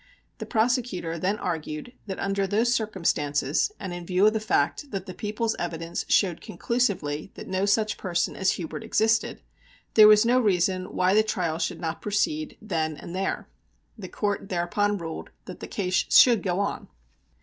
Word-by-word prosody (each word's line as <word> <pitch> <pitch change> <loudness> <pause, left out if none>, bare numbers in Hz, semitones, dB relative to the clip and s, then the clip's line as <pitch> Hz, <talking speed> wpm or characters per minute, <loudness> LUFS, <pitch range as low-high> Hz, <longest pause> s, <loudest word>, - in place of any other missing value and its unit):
The - - -6
prosecutor 220 -8 0
then 195 +5 0
argued 160 +4 -4
that 190 - -4
under 195 0 0
those 225 +5 +2
circumstances, 165 - 0
and 190 -3 -5
in 175 0 -6
view 185 +3 +2
of 215 - +5
the 220 - 0
fact 215 - 0
that 195 -5 -4
the 185 - -7
People's 220 +3 -2
evidence 165 -1 -4
showed 180 -5 +2
conclusively 180 -7 -1
that - - -9
no 190 +1 0
such 215 +1 +1
person 175 -3 -1
as 190 0 +1
Hubert 160 -4 -6
existed, 225 +1 +1 0.5
there 215 -1 +9
was 215 +1 +7
no 245 +2 +4
reason 185 -4 +1
why 185 0 +1
the 215 - +6
trial 180 -7 -2
should 165 0 -2
not 165 -1 -4
proceed 305 +9 -1
then 160 -7 -2
and 170 +4 -8
there. 190 +1 -2 0.5
The 190 -5 -9
Court 205 -1 -2
thereupon 200 +4 0
ruled 165 -3 -6 0.2
that - - -9
the - - -7
case 185 -2 0
should 240 -4 +7
go 180 -1 -1
on. 200 - -2
195 Hz, 170 wpm, -26 LUFS, 170-215 Hz, 0.5 s, there